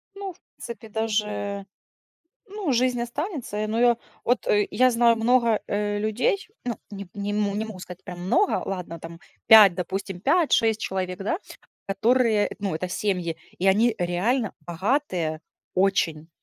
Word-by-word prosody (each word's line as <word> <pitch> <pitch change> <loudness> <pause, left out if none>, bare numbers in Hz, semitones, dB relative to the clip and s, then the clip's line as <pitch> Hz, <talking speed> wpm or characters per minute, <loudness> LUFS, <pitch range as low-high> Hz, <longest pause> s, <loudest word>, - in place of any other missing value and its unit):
Ну, 395 -2 -6
в 345 - -27 0.2
принципе 235 -1 -9
даже, 210 -2 -2 0.8
ну, 400 -7 -2
жизнь 250 0 +2
останется. 265 - -4
Э, 215 - -1
но 220 +2 -1
я 240 -1 +5 0.3
вот, 245 +2 +1
э, 205 0 +3
я 255 0 +4
знаю 235 -1 +4
много, 230 -1 +3
э, 205 0 -1
людей, 220 - 0 0.2
ну, 240 -3 -2
не 200 -2 -8
не 205 0 -3
мо 205 -1 0
могу 220 -2 -4
сказать 180 -1 -10
прям 180 -1 -8
много, 345 - +2
ладно, 180 -3 -5
там 165 +1 -9 0.3
5, 215 -5 +9
допустим, 190 +1 -4
5-6 265 - +3
человек, 185 -1 -3
да, 205 - -1 0.5
которые, 220 +2 +2
э, - - -8
ну, 200 -4 -2
это 180 +3 -3
семьи, 180 -4 -1 0.2
и 185 - 0
они 215 +4 +4
реально 195 +7 0
богатые 175 - -1 0.3
очень. 175 -5 +1
210 Hz, 155 wpm, -25 LUFS, 190-240 Hz, 0.8 s, 5